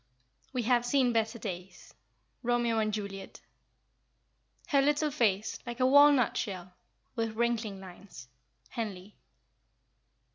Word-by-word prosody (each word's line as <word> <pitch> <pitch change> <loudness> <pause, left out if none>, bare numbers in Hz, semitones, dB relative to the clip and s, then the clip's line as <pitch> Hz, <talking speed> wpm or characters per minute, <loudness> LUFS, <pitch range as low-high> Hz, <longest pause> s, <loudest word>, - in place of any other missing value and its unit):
"We 255 -3 -2
have 240 +1 +3
seen 245 0 +2
better 225 +1 0
days." 185 -4 -8 0.5
ROMEO 240 -1 +1
AND 215 -1 0
JULIET. 200 -2 -6 1.3
"Her 280 -2 +4
little 295 +2 +1
face, 215 -5 0
like 240 +1 -7
a 255 - +3
walnut 285 -2 +6
shell, 185 -3 -4 0.4
With 225 -2 -2
wrinkling 225 -4 -1
lines." 180 -7 -12 0.4
HENLEY. 210 -4 -6
225 Hz, 110 wpm, -30 LUFS, 200-245 Hz, 1.3 s, walnut